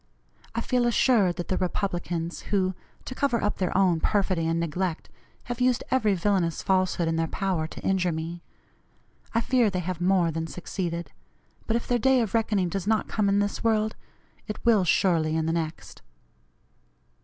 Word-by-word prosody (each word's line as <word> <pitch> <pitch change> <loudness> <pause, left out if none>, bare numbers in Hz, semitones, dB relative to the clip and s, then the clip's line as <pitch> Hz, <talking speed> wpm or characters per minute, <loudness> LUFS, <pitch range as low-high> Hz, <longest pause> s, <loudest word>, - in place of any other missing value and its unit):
I 230 - 0
feel 245 0 +1
assured 225 -6 +3
that 175 - -5
the 185 - 0
Republicans, 175 -3 -2
who, 190 -2 +1 0.3
to - - -5
cover 255 -3 0
up 205 - -1
their 185 -1 0
own 180 -4 +3
perfidy 185 -4 +1
and 165 0 0
neglect, 170 +1 -2 0.3
have 245 0 -5
used 250 -1 +2
every 220 -6 +3
villanous 180 -3 0
falsehood 185 -3 +1
in 165 0 0
their 165 0 +1
power 180 -3 -1
to - - -10
injure 185 -2 +1
me 165 +2 -5 0.9
I 230 - +3
fear 245 -2 +3
they 190 - -3
have 180 0 -3
more 180 -2 +3
than 160 +1 -3
succeeded, 170 -1 -4 0.6
but 225 - +1
if 235 - -2
their 245 -1 +1
day 265 +2 +4
of 220 -4 -2
reckoning 210 -5 +1
does 190 +2 -4
not 220 0 +1
come 210 -2 +1
in 200 - +3
this 205 0 -1
world, 220 -1 +1 0.5
it 210 - -4
will 220 -5 +5
surely 165 -3 +2
in 160 -1 0
the 165 - 0
next. 165 -1 -4
190 Hz, 180 wpm, -26 LUFS, 170-215 Hz, 0.9 s, will